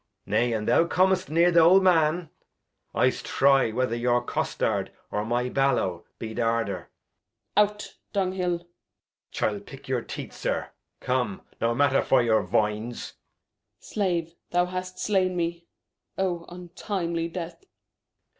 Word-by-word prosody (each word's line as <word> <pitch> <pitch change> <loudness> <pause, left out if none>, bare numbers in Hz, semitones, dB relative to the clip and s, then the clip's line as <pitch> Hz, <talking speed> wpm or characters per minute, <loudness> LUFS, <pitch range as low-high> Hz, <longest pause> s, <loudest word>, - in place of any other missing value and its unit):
Nay, 115 +4 +1
an' 110 -2 -1
thou 165 - +4
com'st 185 +1 +2
near 170 +3 +4
th' 170 - +1
old 175 +4 +7
Man, 165 -2 +3 0.6
I'st - - +2
try 135 -3 +3
whether 125 0 0
your 120 0 +1
Costard, - - -1 0.2
or 105 - -1
my 120 +3 0
Ballow 125 -10 0
be 110 -1 -6
th' - - -5
harder. 115 -6 -1 0.7
Gent. 210 -1 +6
Out 210 0 -10 0.2
Dunghil. 185 -3 0
Edg. - - -24 0.7
ChiU - - -1
pick - - -12
your - - 0
Teeth, - - -7
Zir; - - -2 0.3
come, 125 -6 -1 0.2
no 115 0 +2
Matter 140 +1 +3
vor 130 -2 +3
your 110 -2 +3
Voines. 105 +3 -1
Gent. - - -40
Slave, 175 -5 -1 0.2
thou 175 0 +2
hast 185 0 -5
slain 185 -3 +1
me; 170 0 -2 0.5
oh, 175 -3 -1
untimely 175 -1 -3
Death 170 - -7
165 Hz, 140 wpm, -26 LUFS, 120-180 Hz, 0.7 s, old